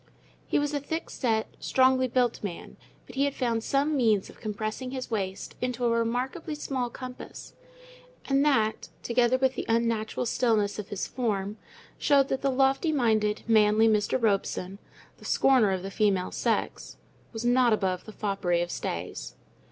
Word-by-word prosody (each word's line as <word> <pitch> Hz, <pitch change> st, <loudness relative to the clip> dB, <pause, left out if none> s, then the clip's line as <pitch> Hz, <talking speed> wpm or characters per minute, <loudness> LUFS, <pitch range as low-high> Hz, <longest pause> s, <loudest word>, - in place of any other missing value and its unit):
He -, -, +1 dB
was 290 Hz, 0 st, 0 dB
a 290 Hz, -, 0 dB
thick 320 Hz, +4 st, -5 dB
set, 220 Hz, -4 st, 0 dB
strongly 260 Hz, 0 st, +3 dB
built 245 Hz, -2 st, 0 dB
man, 180 Hz, -5 st, -6 dB, 0.3 s
but -, -, -13 dB
he 275 Hz, +1 st, +1 dB
had 280 Hz, -, -2 dB
found 230 Hz, -3 st, -1 dB
some 285 Hz, +4 st, +1 dB
means 220 Hz, -7 st, +2 dB
of -, -, -19 dB
compressing 215 Hz, +4 st, -4 dB
his 255 Hz, -2 st, -6 dB
waist 195 Hz, -3 st, -3 dB
into 250 Hz, -1 st, -1 dB
a 235 Hz, -, +3 dB
remarkably 245 Hz, +7 st, -1 dB
small 260 Hz, -4 st, -2 dB
compass; 255 Hz, +1 st, -9 dB, 0.7 s
and 275 Hz, 0 st, +2 dB
that, 220 Hz, -7 st, +1 dB
together 240 Hz, +1 st, +2 dB
with 260 Hz, 0 st, +2 dB
the -, -, -4 dB
unnatural 230 Hz, 0 st, 0 dB
stillness 220 Hz, -4 st, +1 dB
of 205 Hz, -, -6 dB
his 205 Hz, -, -3 dB
form, 210 Hz, -4 st, -2 dB, 0.4 s
showed 280 Hz, -2 st, +3 dB
that 265 Hz, -, -1 dB
the 275 Hz, -, +1 dB
lofty 270 Hz, +4 st, +2 dB
minded, 220 Hz, -6 st, +1 dB
manly 220 Hz, 0 st, +4 dB
Mr. 210 Hz, +2 st, +2 dB
Robson, 195 Hz, -3 st, -1 dB, 0.4 s
the -, -, -16 dB
scorner 255 Hz, -6 st, +4 dB
of 190 Hz, -1 st, -1 dB
the 195 Hz, -, -5 dB
female 195 Hz, -3 st, +1 dB
sex, -, -, -2 dB, 0.3 s
was 225 Hz, 0 st, -5 dB
not 245 Hz, 0 st, +4 dB
above 190 Hz, -4 st, 0 dB
the 215 Hz, -, -9 dB
foppery 195 Hz, -5 st, 0 dB
of 175 Hz, -, -6 dB
stays. 85 Hz, +2 st, -5 dB
230 Hz, 165 wpm, -27 LUFS, 210-260 Hz, 0.7 s, manly